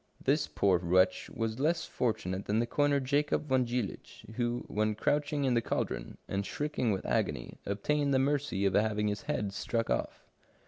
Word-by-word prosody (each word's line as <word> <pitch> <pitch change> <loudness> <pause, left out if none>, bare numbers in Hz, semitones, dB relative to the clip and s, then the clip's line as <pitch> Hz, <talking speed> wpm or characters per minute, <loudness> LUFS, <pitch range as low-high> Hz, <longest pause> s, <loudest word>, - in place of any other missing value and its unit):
This 145 +2 +2
poor 95 -3 +2
wretch 90 +2 +2
was 115 +1 -3
less 165 +4 +1
fortunate 100 -5 -2
than 105 - 0
the 115 - +2
coiner 145 +3 +2
Jacob 145 +3 +1
von 130 -2 +2
Jiilich, 120 -4 -4
who, 120 +1 -1
when 110 +1 0
crouching 145 +5 0
in 130 -2 +2
the 120 - +3
caldron, - - -3
and 100 0 -1
shrieking 145 -1 -1
with 95 - -2
agony, - - -1
obtained 140 +9 0
the 135 - +4
mercy 140 -7 +1
of 95 - +2
having 105 0 +2
his 105 -1 -3
head 100 -2 -1
struck 115 +3 -1
off". - - -2
115 Hz, 175 wpm, -31 LUFS, 100-140 Hz, -, the